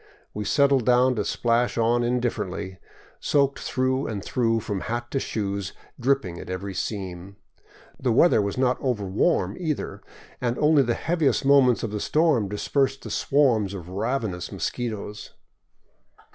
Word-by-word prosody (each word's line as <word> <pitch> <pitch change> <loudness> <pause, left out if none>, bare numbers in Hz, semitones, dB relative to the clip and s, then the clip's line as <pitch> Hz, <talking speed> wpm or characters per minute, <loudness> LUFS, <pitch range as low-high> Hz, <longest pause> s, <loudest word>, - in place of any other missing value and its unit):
We 105 0 -4
settled 140 +3 +3
down 125 +2 +4
to 105 - +1
splash 120 +3 0
on 120 +1 +2
indifferently, 105 -6 -2 0.4
soaked 140 -1 +1
through 130 +1 -1
and 105 -3 -5
through 115 -2 +1
from 105 -2 -3
hat 120 +1 -4
to 135 - 0
shoes, 100 -5 -3 0.3
dripping 125 -9 0
at - - -9
every 95 +2 -4
seam. 95 -1 -5 0.6
The 125 - 0
weather 120 0 +5
was 100 +2 -3
not 130 -1 +1
over 125 -7 -1
warm 100 - +1
either, 160 -5 -3 0.4
and 120 -1 -1
only 150 -1 +4
the 120 -3 0
heaviest 160 -5 0
moments 135 -3 +5
of - - -2
the 105 - -3
storm 150 - +2
dispersed 135 +6 0
the - - -7
swarms 115 -9 +2
of 90 -2 -8
ravenous 100 -2 -2
mosquitoes. 105 -3 -5
120 Hz, 145 wpm, -25 LUFS, 100-135 Hz, 0.6 s, weather